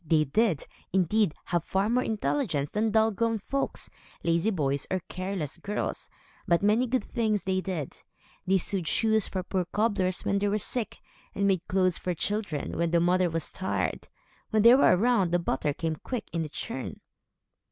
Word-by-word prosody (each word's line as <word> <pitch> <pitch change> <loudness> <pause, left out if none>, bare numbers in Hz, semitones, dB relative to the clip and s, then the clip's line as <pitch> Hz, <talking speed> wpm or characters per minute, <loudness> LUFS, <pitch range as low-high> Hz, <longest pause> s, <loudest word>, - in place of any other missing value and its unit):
They 155 -1 +3
did, 165 +2 +1 0.3
indeed, 190 0 +2
have 175 -2 0
far 195 +3 0
more 245 +3 +2
intelligence 210 - -1
than 220 +1 +1
dull 220 +1 +3
grown 225 +2 0
folks, 275 +7 -3 0.3
lazy 170 +5 +2
boys, 140 -8 -1
or 185 -1 -1
careless 185 -4 -4
girls; 205 +4 -3 0.4
but 170 0 +3
many 220 +5 +3
good 255 +1 0
things 215 -3 -1
they 185 0 0
did. 175 -8 -5 0.5
They 190 +1 +4
sewed 185 -1 -2
shoes 220 +3 +2
for 185 -1 -3
poor 185 0 -1
cobblers, 200 -3 0
when 200 - +1
they 205 - +1
were 205 +1 +1
sick, 225 +2 -1 0.4
and 200 - +1
made 190 -3 +1
clothes 185 -1 +2
for 180 -1 -2
children, 200 -5 -2
when 170 0 +2
the 170 +1 +3
mother 180 +1 +3
was 165 -1 -1
tired. 190 - -2 0.4
When 215 -2 +2
they 235 +1 +9
were 260 -8 +6
around, 230 -3 +3
the 175 - +4
butter 150 -4 -1
came 160 +2 -3
quick 250 - -5
in 165 - 0
the 155 - -3
churn. 135 -2 -5
190 Hz, 180 wpm, -28 LUFS, 170-215 Hz, 0.5 s, they